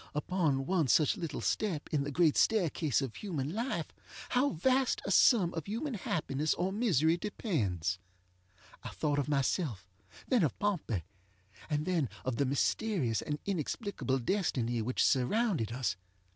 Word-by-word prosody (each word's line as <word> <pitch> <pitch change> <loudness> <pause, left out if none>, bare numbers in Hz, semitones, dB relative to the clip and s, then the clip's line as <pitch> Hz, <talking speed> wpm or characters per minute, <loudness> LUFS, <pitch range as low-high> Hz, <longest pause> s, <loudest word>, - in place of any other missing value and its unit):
Upon 150 -4 0
one 175 -4 +1
such 150 +3 +4
little 165 -5 -4
step 185 -9 -1
in 145 -2 +2
the 140 - -3
great 160 0 +3
staircase 165 - +2
of 130 -4 -5
human 160 -7 -3
life 220 -7 -3 0.4
how 255 +3 +3
vast 260 - +1
a - - -1
sum 195 -9 +5
of 165 -3 -5
human 245 +7 -3
happiness 155 - -1
or 185 +2 -1
misery 170 - +2
depends! 100 - -2 0.8
I - - -6
thought 145 -1 -1
of 145 - -2
myself, 135 - 0 0.4
then 250 -4 +3
of 150 -8 0
Pompey, 165 - -1 0.7
and 150 0 0
then 170 -8 0 0.2
of 130 -2 -1
the 140 - +1
mysterious 140 - 0
and 150 - -3
inexplicable 195 - -2
destiny 125 - 0
which 125 +4 0
surrounded 140 - +1
us. 120 -4 -1
155 Hz, 145 wpm, -32 LUFS, 135-200 Hz, 0.8 s, sum